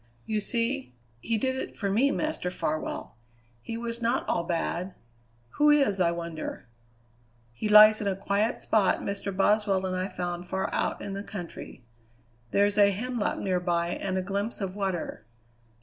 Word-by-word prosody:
"You 215 -1 -1
see 235 - -1 0.2
he 225 - -1
did 260 +4 0
it 260 - -5
for 200 - -2
me, 245 +8 +3
Master 310 -12 -1
Farwell. 155 -8 -3 0.4
He 225 - -5
was 235 0 -4
not 235 +3 0
all 170 - +1
bad. 170 +2 -2 0.6
Who 295 0 +6
is, 275 -10 +4
I 175 -2 +4
wonder? 170 -4 -5 0.9
He 210 - -3
lies 215 +1 +9
in 205 - -1
a 195 - +1
quiet 200 +4 0
spot 210 -4 +2
Mr. 200 0 -3
Boswell 200 -1 +2
and 185 0 -2
I 185 +1 -1
found 175 -2 -4
far 190 +1 -2
out - - -1
in 200 - -5
the 200 - -4
country. 175 - -8 0.6
There's 205 - +2
a 200 -1 +7
hemlock 230 +3 -2
nearby 175 -2 0
and 190 +1 -2
a 185 - -1
glimpse 200 +4 -3
of 195 -2 -4
water. 190 - -3
200 Hz, 165 wpm, -28 LUFS, 180-220 Hz, 0.9 s, lies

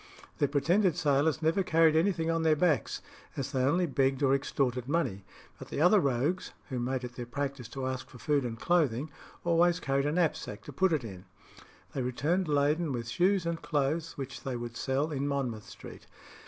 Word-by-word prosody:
The 145 - +3
pretended 165 +6 +2
sailors 155 0 +2
never 165 +5 +3
carried 165 -3 +4
anything 165 -1 +2
on 165 0 0
their 160 -1 +4
backs, 155 -2 +1 0.3
as 135 - -3
they 130 - 0
only 165 +8 +2
begged 135 -2 +1
or 135 -1 +4
extorted 130 -3 0
money; 135 - -1 0.4
but - - -9
the - - -4
other 180 +6 +6
rogues, 140 +5 0 0.2
who 130 -3 -2
made 130 +1 -2
it 125 0 -6
their 120 -1 -5
practice 140 -2 -4
to 130 +2 -5
ask 130 0 -4
for - - -12
food 145 +2 +1
and 115 -2 -4
clothing, 150 -5 +1 0.3
always 175 +1 +3
carried 140 -2 0
a - - +1
knapsack 160 -1 -1
to - - -9
put 190 -1 +2
it 155 -5 +1
in. 95 -4 -9 0.7
They 135 - -2
returned 150 +9 0
laden 150 +2 +1
with 120 -2 -4
shoes 185 +6 +2
and 170 -1 -2
clothes, 155 +2 -1
which 135 -2 -6
they 130 -2 -4
would 120 0 -6
sell 140 +6 -1
in 140 -1 -1
Monmouth 125 -7 -3
Street. - - -11
145 Hz, 195 wpm, -30 LUFS, 130-165 Hz, 0.7 s, other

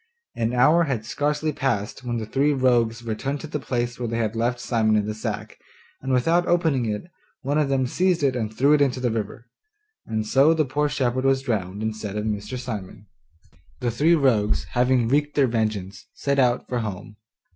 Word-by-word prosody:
An 115 0 0
hour 150 +7 +4
had 120 -7 -2
scarcely 150 +5 -1
passed 120 -4 -2
when 120 -1 -2
the 110 - -3
three 140 +6 +1
rogues 120 -3 +2
returned 125 +5 -3
to - - -6
the 150 -1 -4
place 120 -2 -3
where 120 - -2
they 115 +1 -2
had 110 -1 -1
left 120 +2 0
Simon 110 -3 +1
in 105 -1 +1
the 110 - -3
sack, 110 -1 -5 0.4
and 135 - -3
without 165 +8 +2
opening 160 -9 +2
it, 105 -1 -2 0.4
one 145 +3 +1
of 145 -2 +1
them 135 -1 +1
seized 180 +4 +1
it 135 -2 +2
and 110 -3 -2
threw 140 +6 +3
it 150 - +4
into 130 -2 +2
the 125 -2 0
river. 110 +1 -4 0.6
And 110 -1 -2
so 140 +8 +4
the 155 -1 +2
poor 145 +3 0
shepherd 130 -2 0
was 135 0 +2
drowned 105 -5 -2
instead 110 -2 -4
of 105 - -2
Mr. 105 +3 -3
Simon! 105 -5 -7 0.7
The 120 -2 -1
three 155 +9 +3
rogues, 105 - +2
having 125 -1 +2
wreaked 145 +4 +1
their 140 - +4
vengeance, 110 -5 -2
set 140 0 0
out, 125 -2 +2
for 125 - -2
home. 105 -1 -6
125 Hz, 200 wpm, -24 LUFS, 110-140 Hz, 0.7 s, hour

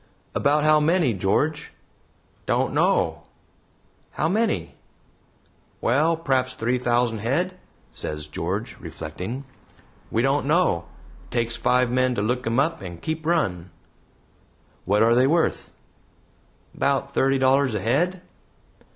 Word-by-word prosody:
"About 145 +1 +2
how 155 0 +5
many, 160 -4 +2
George?" 145 +11 -1 0.7
"Don't - - +1
know." - - +1 0.9
"How 155 - 0
many?" 190 - 0 1.1
"'Well, 155 +7 +2
p'r'aps 130 -5 0
three 125 +1 0
thousand 120 -2 +1
head," 150 - 0 0.4
says 75 +5 -5
George, 75 - -4
reflecting. 95 - -6 0.6
"We 115 - 0
don't 135 +1 +1
know, 155 - +2 0.4
takes 115 -1 -1
five 125 0 +2
men 130 0 +2
to 100 - -1
look 125 +2 -1
'em 115 +3 +1
up 160 +4 0
and 85 -3 -8
keep 160 - -4
run." 90 - 0 1.2
"What 105 +3 +3
are 115 +1 +4
they 125 +2 +4
worth?" 165 +3 0 1.0
"About 140 -1 0
thirty 135 0 +2
dollars 130 -2 +3
a - - 0
head." 175 - 0
130 Hz, 120 wpm, -24 LUFS, 115-150 Hz, 1.2 s, how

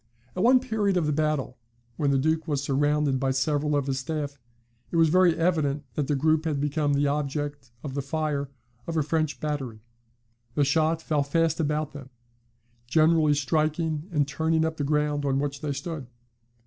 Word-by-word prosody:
At 180 - -1
one 250 +4 +6
period 215 -6 0
of 170 - +1
the 150 - +1
battle, 150 -5 -1 0.4
when 145 +2 0
the 140 - +3
Duke 160 +4 0
was 145 -3 -1
surrounded 145 0 +1
by 135 0 0
several 145 +3 +1
of 140 -2 +1
his 135 -1 -1
staff, 145 0 -4 0.5
it - - -5
was 165 -1 +5
very 180 0 +4
evident 155 -4 +1
that 140 +3 -1
the 145 - +1
group 155 +3 +2
had 150 -3 0
become 145 0 0
the 145 +1 +2
object 145 -2 -2
of 140 -3 -5
the 140 - -2
fire 145 -1 -2 0.4
of 165 -1 -2
a 155 - +3
French 155 0 -1
battery. 135 -8 -4 0.7
The 145 - +3
shot 160 +3 +1
fell 150 -2 +1
fast 160 +3 +1
about 150 -1 -1
them, 135 -2 -10 0.8
generally 155 +1 +4
striking 155 +3 0
and 145 -4 +1
turning 160 +3 +1
up 160 0 -3
the 145 - -1
ground 150 0 0
on 135 -1 +1
which 140 0 -2
they 150 - -2
stood. 140 -1 -5
150 Hz, 185 wpm, -26 LUFS, 140-160 Hz, 0.8 s, one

